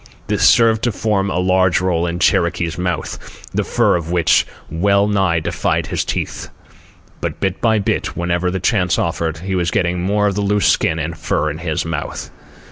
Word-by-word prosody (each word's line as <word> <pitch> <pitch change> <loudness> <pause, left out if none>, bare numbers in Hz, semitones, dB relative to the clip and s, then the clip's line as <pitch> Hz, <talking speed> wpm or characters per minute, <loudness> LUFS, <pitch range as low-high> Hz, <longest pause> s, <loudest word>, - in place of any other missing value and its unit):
This 105 -1 -1
served 115 -2 +4
to 120 - +1
form 100 -2 0
a 90 - -2
large 90 0 +2
roll 85 -2 0
in 85 0 -3
Cherokee's 85 -2 +1
mouth, 90 -2 -5
the - - 0
fur - - +2
of 85 -2 -3
which 85 -2 +3 0.2
well 100 +5 +2
nigh 95 -5 +1
defied 80 - -1
his - - -2
teeth. - - -4 0.7
But - - -4
bit 95 -1 -2
by 110 -2 +3
bit, 100 - -2
whenever 85 +1 0
the 95 +1 -2
chance 90 -2 +1
offered, 85 -1 -1
he 95 +4 -5
was 90 -2 0
getting 90 0 0
more 105 +3 +1
of 100 - +1
the 105 - -2
loose 105 0 +1
skin 80 - +2
and 80 +1 -3
fur 75 -1 -1
in 75 - -7
his 80 -3 -2
mouth. 80 -3 -5
90 Hz, 190 wpm, -18 LUFS, 85-100 Hz, 0.7 s, served